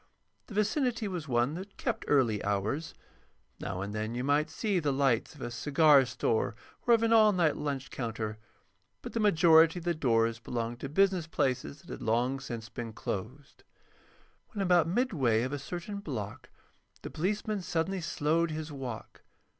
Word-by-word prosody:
The 210 - -9
vicinity 225 +1 +1
was 175 -5 -5
one 120 +2 +1
that 190 +4 -8
kept - - -2
early 120 -7 +2
hours. 105 +10 -2 0.6
Now 95 -1 -4
and 100 +1 -4
then 110 +2 -3
you 125 - -2
might 145 +2 +2
see 205 -5 0
the 150 -4 0
lights 135 -1 +1
of 145 - -14
a 120 - -4
cigar 145 +1 +4
store 115 -2 0 0.3
or 235 - +7
of 230 - -1
an 230 0 +3
all 215 -2 +7
night 170 -6 +2
lunch 140 -3 -4
counter; 110 -3 -4 0.6
but - - -7
the 230 - -1
majority 165 -4 +5
of 175 - -7
the 175 - +2
doors 115 -6 +1
belonged 120 0 -4
to 135 - -5
business 185 +1 +2
places 125 - -1
that - - -17
had - - -7
long 120 +4 +1
since 120 -4 -6
been 115 +1 -6
closed. 125 +9 -6 0.8
When 205 -4 -3
about 180 -3 +4
midway 160 - +1
of 130 +3 -3
a 145 - -2
certain 175 +8 -6
block 115 - -6 0.5
the - - -6
policeman 205 +4 -1
suddenly 175 +2 -1
slowed 165 0 +1
his 155 0 -5
walk. 130 -5 -7
145 Hz, 170 wpm, -30 LUFS, 120-180 Hz, 0.8 s, or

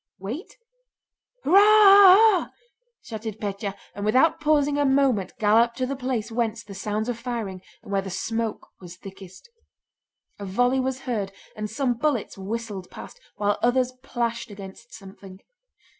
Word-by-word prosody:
"Wait?... 255 - -7 0.9
Hurrah 365 +7 +6
ah 405 -2 +8
ah!" 435 -4 +3 0.5
shouted 220 -1 -7
Pétya, 200 -1 -4 0.2
and 200 - -7
without 260 +10 +3
pausing 295 -2 +2
a - - +3
moment 265 -7 +1
galloped 230 +3 +3
to 255 - -1
the 275 +2 -4
place 250 -4 -3
whence 225 -2 -2
came 210 - -29
the - - -7
sounds 215 +2 -3
of 240 -2 -3
firing 230 -6 -5 0.2
and - - -11
where 195 -1 +1
the 195 - -7
smoke 225 +4 -4
was 180 -1 -11
thickest. 195 - -13 0.9
A 200 - -6
volley 245 +7 +1
was 260 0 -2
heard, 220 -7 -3 0.2
and 215 0 -5
some 245 +3 -1
bullets 285 -7 -1
whistled 200 -1 -6
past, - - -11 0.2
while 205 0 -1
others 250 +1 +2
plashed 235 -3 -3
against 200 +3 -11
something. 195 -2 -13
230 Hz, 155 wpm, -24 LUFS, 200-265 Hz, 0.9 s, ah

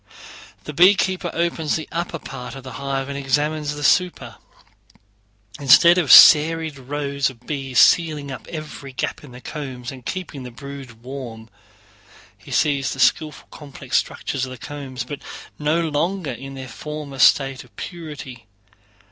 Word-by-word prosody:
The 150 - -7
beekeeper 185 +1 +3
opens 165 -2 -1
the 160 - -4
upper 170 0 -3
part 125 -4 -8
of 135 - -9
the 130 - -9
hive 135 +1 -3
and 140 - -5
examines 145 +2 -1
the 145 - -6
super. 180 +5 +1 1.2
Instead 170 +6 +6
of 155 -7 +1
serried 160 -1 +7
rows 140 +1 -2
of 125 -2 -16
bees 135 -4 -4
sealing 155 -4 +4
up 130 - -8
every 150 -4 -8
gap 130 - -4
in 145 - -12
the 125 - -11
combs 130 -6 -6
and 130 -2 -11
keeping 170 -1 -5
the 125 - -7
brood 130 -2 -10
warm, 120 -4 -8 0.9
he - - -17
sees 140 -3 +1
the 135 - -9
skillful 155 +1 +1
complex 145 -3 -7
structures 130 - -1
of 130 - -3
the 130 - -8
combs, 130 -2 -6
but 140 +3 -8 0.4
no 160 +3 +1
longer 165 +1 -1
in 135 +3 -8
their 130 -1 -7
former 145 +3 -7
state 135 0 +4
of 120 -5 -23
purity. 145 - -8
140 Hz, 155 wpm, -21 LUFS, 130-155 Hz, 1.2 s, serried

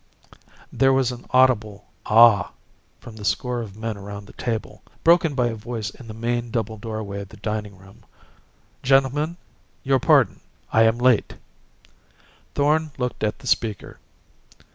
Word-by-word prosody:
There 135 0 +3
was 130 -2 +2
an 120 -1 -10
audible 115 -6 +2 0.2
"Ah!" 110 -4 +6 0.5
from 110 -2 -12
the 105 - -9
score 125 +3 -1
of 105 -3 -9
men 110 -1 -4
around 100 +1 -8
the - - -15
table 115 -3 -4 0.2
broken 165 -3 +4
by 125 -2 +1
a - - -4
voice 110 0 -5
in 125 - -14
the 110 - -8
main 120 +1 -2
double 110 -2 -3
doorway 110 -3 -5
of 100 - -10
the - - -14
dining 105 -2 -4
room: 95 +1 -18 0.8
"Gentlemen, 135 +5 +2 0.5
your 135 -1 +2
pardon, - - +3 0.3
I 115 0 +5
am 110 +1 +3
late." 125 -2 +2 1.2
Thorn 155 +2 +2
looked 125 -3 -3
at 105 0 0
the - - -16
speaker. 110 -5 -2
115 Hz, 150 wpm, -23 LUFS, 105-130 Hz, 1.2 s, Ah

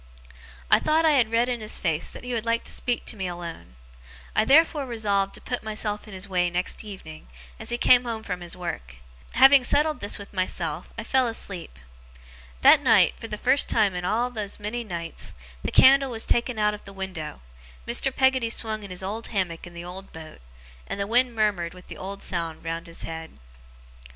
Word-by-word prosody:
I - - +8
thought 315 +1 +2
I 315 - +6
had 250 -7 +3
read 230 +2 +2
in 245 -2 -2
his 215 - -1
face 165 -3 -1
that - - -10
he 250 0 -4
would 230 -2 -1
like 230 0 0
to - - -6
speak 245 -1 -2
to - - +1
me 190 -3 -3
alone. 170 - -8 0.6
I - - +3
therefore 295 0 +4
resolved 200 -4 0
to - - -10
put 245 - -3
myself 210 -1 -3
in 205 - -9
his 190 +1 -3
way 180 -2 +1
next 180 +4 -1
evening, 185 - -10 0.3
as - - -7
he 240 - -1
came 250 0 +6
home 225 -2 -4
from 180 -4 -4
his 175 0 -4
work. 65 - -6 0.4
Having 270 +2 +7
settled 300 +4 +2
this 205 - -2
with 200 0 -11
myself, 180 -4 -2
I 230 - -4
fell 260 +2 +2
asleep. 185 - -5 0.8
That - - +7
night, - - +5
for 225 - -7
the 210 - -5
first 275 +6 +3
time 210 -4 +3
in 180 0 -4
all 235 +7 0
those 215 -4 -5
many 215 +4 -4
nights, 170 -6 -6 0.3
the - - -1
candle 275 0 +6
was 225 -2 -3
taken 240 0 +1
out 210 0 +2
of 210 - -9
the 195 - -10
window, 180 - -6 0.4
Mr. 240 +3 +2
Peggotty 260 -3 +2
swung 220 -1 -2
in 200 - -9
his 180 0 -6
old 215 +4 -4
hammock 180 -5 -2
in 175 - -13
the 170 0 -7
old 190 +2 -9
boat, 160 - -11 0.5
and - - -4
the 200 - 0
wind 240 +3 +2
murmured 200 -6 0
with 180 - -15
the - - -8
old 195 +1 -6
sound 165 -3 -3
round 165 +1 -4
his 165 - -7
head. 160 0 -7
210 Hz, 210 wpm, -25 LUFS, 180-235 Hz, 0.8 s, I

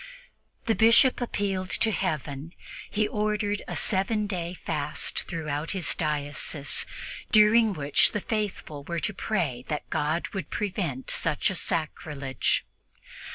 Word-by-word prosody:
The 225 - +3
Bishop 230 +4 +5
appealed 195 -5 -1
to 225 - +2
Heaven. 155 -4 -3 0.4
He 215 0 +1
ordered 210 -1 -1
a - - -4
seven 210 +2 +1
days' 180 -3 -4
fast - - -1
throughout 155 -2 -3
his 180 - +1
diocese, 145 -1 0 0.4
during 215 0 +6
which 145 -4 +3
the 210 - -1
faithful 200 -9 -3
were 170 +3 -3
to 210 - -1
pray 165 - -1
that 150 - -3
God 155 +3 0
would 195 - -5
prevent 180 -10 -2
such 150 - +1
a - - -4
sacrilege. 145 -5 -1
185 Hz, 125 wpm, -27 LUFS, 150-210 Hz, 0.4 s, during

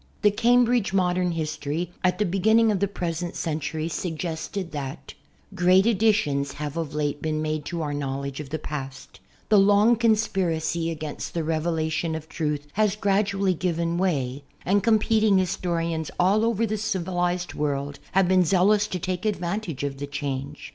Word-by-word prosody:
The 210 - +6
"Cambridge 240 -1 +3
Modern 180 -2 +1
History" 155 +1 -3
at 180 -1 +2
the 210 - +1
beginning 220 +5 +3
of 200 - 0
the 200 - +2
present 175 -2 -4
century 155 0 -2
suggested 170 +2 -4
that 140 0 -6 0.4
Great 185 +1 +4
additions 200 -11 +2
have 150 0 -5
of 160 -3 -4
late 145 -1 -1
been 155 -1 -1
made 155 -1 -2
to 170 -2 -3
our 145 -1 -3
knowledge 140 -1 -3
of 145 -3 -7
the 155 - -2
past; 135 -9 -7 0.3
tlw 205 -2 +7
long 205 +4 +5
conspiracy 185 -8 +1
against 155 -1 -5
the 165 - 0
rezfclation 160 0 -1
of 160 0 -10
truth 150 -3 -2
has 210 -1 +2
gradually 200 -2 +1
given 170 -1 -1
7i\]y, 140 -8 0 0.2
and 200 +3 +3
competing 220 -1 +3
historians 170 -3 -1
all 200 +5 +3
over 230 -1 +1
the 215 0 -2
civil 185 -4 -2
ized 175 0 -1
world 140 -1 -2
have 195 -1 +4
been 185 0 +4
zealous 200 +4 +3
to 185 - -3
take 180 0 -3
advantage 190 -6 -2
of 140 -1 -3
the 145 - -4
change. 140 0 -5
175 Hz, 160 wpm, -25 LUFS, 155-195 Hz, 0.4 s, tlw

